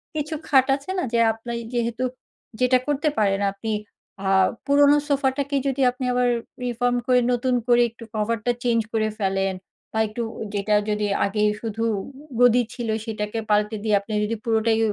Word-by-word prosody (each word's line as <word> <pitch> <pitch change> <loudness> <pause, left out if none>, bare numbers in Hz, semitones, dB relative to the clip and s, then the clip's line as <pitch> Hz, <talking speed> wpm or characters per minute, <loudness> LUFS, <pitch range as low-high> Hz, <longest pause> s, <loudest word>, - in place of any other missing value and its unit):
কিছু 305 +1 -2
খাট 265 -2 +5
আছে 280 +5 -11
না - - 0
যে 235 - +3
আপনি 225 +2 -7 0.2
যেহেতু 235 +1 -1 0.6
যেটা 255 0 +4
করতে 295 +1 +1
পারেন, 195 -2 +2
আপনি 200 +3 -6 0.6
আ - - 0 0.4
পুরোনো 285 +1 +5
সোফাটাকে 280 0 0
যদি 270 0 -1
আপনি 255 +1 -5
আবার 250 0 +2 0.4
রিফর্ম 245 0 0
করে 250 -1 +5
নতুন 250 +1 +1
করে 240 0 +5
একটু 230 +1 -14
কভার 220 +2 0
টা 245 - +3
চেঞ্জ 235 -2 +2
করে 215 -1 +1
ফেলেন 195 -1 0 0.4
বা - - -4
একটু 215 +3 -5 0.3
যেটা 205 +1 +1
যদি 210 0 0 0.2
আগে 205 +1 -1 0.2
শুধু 225 0 -3 0.6
গদি 245 0 +6
ছিল 240 -2 -4 0.2
সেটাকে 215 0 -3
পাল্টে 210 +1 +2
দিয়ে 215 -2 +2
আপনি 200 - -11
যদি 225 +2 -1
পুরোটাই 225 -1 +2
235 Hz, 165 wpm, -23 LUFS, 215-255 Hz, 0.6 s, গদি